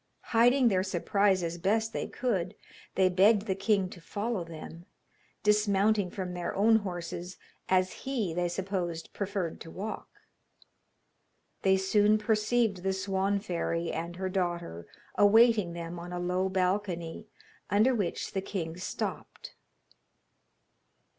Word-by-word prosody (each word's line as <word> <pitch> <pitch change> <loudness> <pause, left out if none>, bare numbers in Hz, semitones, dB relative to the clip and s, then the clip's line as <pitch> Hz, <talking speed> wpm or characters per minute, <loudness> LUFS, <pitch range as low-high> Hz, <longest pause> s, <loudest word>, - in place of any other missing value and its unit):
Hiding 245 +2 +5
their 185 -3 +2
surprise 190 +1 +1
as 170 +1 -3
best 220 +5 +1
they - - -2
could, 195 -8 -2 0.4
they 190 -1 +4
begged 195 +3 +4
the 195 - 0
king 195 0 +1
to 175 - -11
follow 205 +3 -3
them, 165 +1 -10 0.6
dismounting 210 -1 +3
from 185 -1 -5
their 175 -1 -4
own 220 +3 +5
horses, 180 -2 -5 0.3
as 185 0 +3
he, 235 -11 -3
they 175 +1 0
supposed, 175 -3 -3
preferred 195 -4 -3
to 165 - -9
walk. 205 +6 -6 1.5
They 190 0 +4
soon 205 +2 +3
perceived 215 -1 +1
the 190 +1 0
Swan 190 +1 0
fairy 170 -3 -2
and 170 +2 -4
her 190 +1 -3
daughter 175 - -3 0.3
awaiting 210 -3 +5
them 170 0 -6
on 175 +1 -8
a 180 - -3
low 180 +2 0
balcony, 185 -1 -1 0.4
under 215 +7 +4
which 200 -7 -2
the 195 - -2
king 170 -4 -4
stopped. 180 - -5
190 Hz, 130 wpm, -29 LUFS, 175-210 Hz, 1.5 s, Hiding